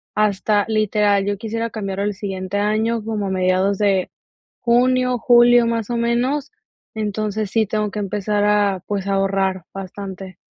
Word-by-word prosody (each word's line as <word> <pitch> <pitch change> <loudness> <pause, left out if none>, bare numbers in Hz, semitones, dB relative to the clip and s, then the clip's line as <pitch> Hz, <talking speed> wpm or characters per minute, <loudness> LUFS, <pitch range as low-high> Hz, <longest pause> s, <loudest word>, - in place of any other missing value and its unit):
hasta 205 0 +1
literal 210 -2 +2
yo 205 0 -1
quisiera 230 +2 -3
cambiarlo 195 -2 -3
el 205 -1 -2
siguiente 190 -1 -4
año 220 +2 0
como 215 -3 -2
a - - -2
mediados 185 +1 +1
de 195 -3 +1 0.5
junio, 250 +1 +2
julio, 240 0 +5
más 230 -2 -2
o 240 - -1
menos, 250 +5 0 0.4
entonces 215 -1 -2
sí 225 -1 +2
tengo 210 0 -1
que 210 - -4
empezar 205 +1 -1
a, 205 -2 +2
pues, 200 -2 -3
ahorrar 195 -1 0
bastante. 190 -1 -8
210 Hz, 150 wpm, -20 LUFS, 195-225 Hz, 0.5 s, julio